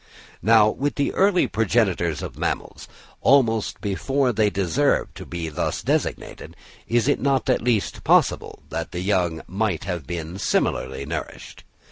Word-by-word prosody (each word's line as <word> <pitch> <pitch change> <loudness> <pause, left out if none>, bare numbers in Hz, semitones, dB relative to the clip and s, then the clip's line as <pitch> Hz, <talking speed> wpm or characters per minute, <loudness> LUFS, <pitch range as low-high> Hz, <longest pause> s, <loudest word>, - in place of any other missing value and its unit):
Now, 110 +2 +5
with 140 +6 -1
the 140 - 0
early 195 -2 +3
progenitors 100 -7 0
of - - -6
mammals, - - -4 0.3
almost 115 -5 +3
before 125 +6 0
they 105 -1 +2
deserved 95 -5 0
to - - -9
be 85 -2 -4
thus 75 - -3
designated, - - -2 0.3
is 120 +1 +1
it 145 - +2
not 135 -2 +1
at - - +1
least 115 -3 -1
possible - - +2
that - - -4
the 90 - -3
young 90 -4 0
might 100 -2 -2
have 85 -7 -4
been 85 +1 -5
similarly 65 -7 -1
nourished? 75 +1 -7
105 Hz, 145 wpm, -23 LUFS, 85-120 Hz, 0.3 s, Now